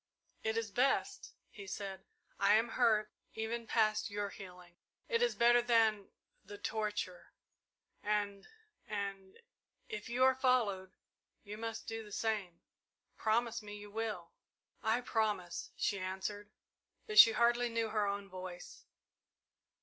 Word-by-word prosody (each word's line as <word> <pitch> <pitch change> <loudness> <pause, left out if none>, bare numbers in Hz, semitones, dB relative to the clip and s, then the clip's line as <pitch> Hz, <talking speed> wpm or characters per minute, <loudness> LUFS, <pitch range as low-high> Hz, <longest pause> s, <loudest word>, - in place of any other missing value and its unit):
"It 220 0 0
is 225 -2 -2
best," 255 +6 0 0.2
he 200 -2 -10
said. 195 0 -6 0.3
"I 200 +1 +5
am 225 +2 +2
hurt 215 -3 +2 0.2
even 225 +1 -3
past 215 0 +2
your 205 0 -3
healing 180 -3 -12 0.3
it 465 -1 +1
is 485 - +2
better 240 0 +5
than 225 -4 +3 0.4
the 205 - -10
torture 210 -4 -3 0.7
and 205 -1 -1 0.4
and 195 -2 -5 0.5
if 210 +1 -6
you 245 +2 +2
are 260 0 +6
followed, 225 -8 +1 0.5
you 205 -1 -7
must 225 0 -5
do 225 0 -5
the 210 - -13
same. 205 -5 -2 0.5
Promise 230 +1 0
me 205 -1 -8
you 205 0 -11
will!" 215 -6 -4 0.5
"I 225 +1 +1
promise," 215 -7 -1
she 200 - 0
answered, 190 +2 -4 0.6
but 430 -1 +4
she 225 - +11
hardly 240 +1 +3
knew 230 -1 -1
her 210 -1 +1
own 200 0 -3
voice. 185 -1 -9
215 Hz, 135 wpm, -34 LUFS, 200-230 Hz, 0.7 s, she